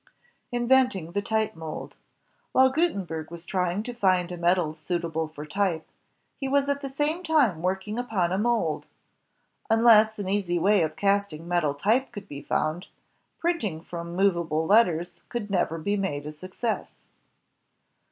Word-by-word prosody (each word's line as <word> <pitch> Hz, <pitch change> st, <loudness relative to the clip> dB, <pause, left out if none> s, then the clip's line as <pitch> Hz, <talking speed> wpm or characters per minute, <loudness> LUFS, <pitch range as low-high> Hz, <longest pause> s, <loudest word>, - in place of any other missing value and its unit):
Inventing 240 Hz, -8 st, +2 dB
the 200 Hz, +3 st, -1 dB
Type 220 Hz, -1 st, -1 dB
Mold 160 Hz, -1 st, -7 dB, 0.6 s
While 260 Hz, 0 st, +5 dB
Gutenberg 195 Hz, -, -1 dB
was 170 Hz, 0 st, -9 dB
trying 180 Hz, +2 st, -1 dB
to 245 Hz, -, -5 dB
find 185 Hz, -6 st, +2 dB
a -, -, -4 dB
metal 175 Hz, -2 st, +1 dB
suitable 160 Hz, 0 st, -2 dB
for 155 Hz, -1 st, -9 dB
type, 170 Hz, -1 st, -1 dB, 0.5 s
he 270 Hz, -, -2 dB
was 280 Hz, +1 st, +2 dB
at 280 Hz, 0 st, 0 dB
the 275 Hz, -, -4 dB
same 295 Hz, +5 st, -1 dB
time 290 Hz, -, +2 dB
working 190 Hz, +5 st, -2 dB
upon 200 Hz, -8 st, 0 dB
a 190 Hz, -, 0 dB
mold. 220 Hz, -9 st, 0 dB, 0.8 s
Unless 220 Hz, -1 st, +6 dB
an 200 Hz, -2 st, -4 dB
easy 190 Hz, -3 st, 0 dB
way 200 Hz, +3 st, +4 dB
of 155 Hz, -1 st, -1 dB
casting 195 Hz, -3 st, 0 dB
metal 170 Hz, -5 st, +1 dB
type 225 Hz, -, +1 dB
could 205 Hz, -1 st, -9 dB
be 140 Hz, -4 st, -7 dB
foimd, 155 Hz, +4 st, -1 dB, 0.5 s
printing 280 Hz, -, -1 dB
from 170 Hz, 0 st, -6 dB
movable 170 Hz, -5 st, +1 dB
letters 175 Hz, -4 st, +3 dB
could 215 Hz, -4 st, -4 dB
never 175 Hz, -3 st, +1 dB
be 200 Hz, +6 st, -1 dB
made 170 Hz, -8 st, -2 dB
a 150 Hz, -, -5 dB
success. 185 Hz, +8 st, -4 dB
190 Hz, 150 wpm, -26 LUFS, 165-225 Hz, 0.8 s, Unless